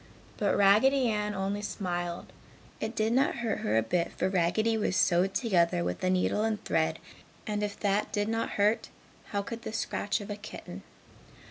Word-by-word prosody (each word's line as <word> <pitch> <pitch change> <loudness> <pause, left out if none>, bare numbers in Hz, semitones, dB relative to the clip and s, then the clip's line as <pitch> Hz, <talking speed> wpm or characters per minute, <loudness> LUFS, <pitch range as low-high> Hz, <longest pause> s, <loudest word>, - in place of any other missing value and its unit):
But 205 - +1
Raggedy 235 +6 +5
Ann 210 -1 -1
only 195 +2 -2
smiled 175 -4 -4 0.5
it 220 +1 -4
did 220 +1 +1
not 265 +3 +2
hurt 235 -3 -2
her 110 - +1
a 110 - +3
bit 170 +9 0
for 185 - 0
Raggedy 195 +5 +2
was 210 -4 0
sewed 185 +1 +3
together 170 - +2
with 90 - -3
a 185 - +2
needle 185 +3 +1
and 220 -2 0
thread 160 0 +1 0.5
and 210 -1 -2
if 205 -1 -3
that 205 0 +1
did 205 -1 0
not 225 +1 -1
hurt, 210 +2 +2 0.4
how 200 -1 -2
could 230 +3 -6
the - - -5
scratch 210 -1 -1
of 205 0 -7
a - - -2
kitten? 210 +1 -9
205 Hz, 185 wpm, -29 LUFS, 185-220 Hz, 0.5 s, Raggedy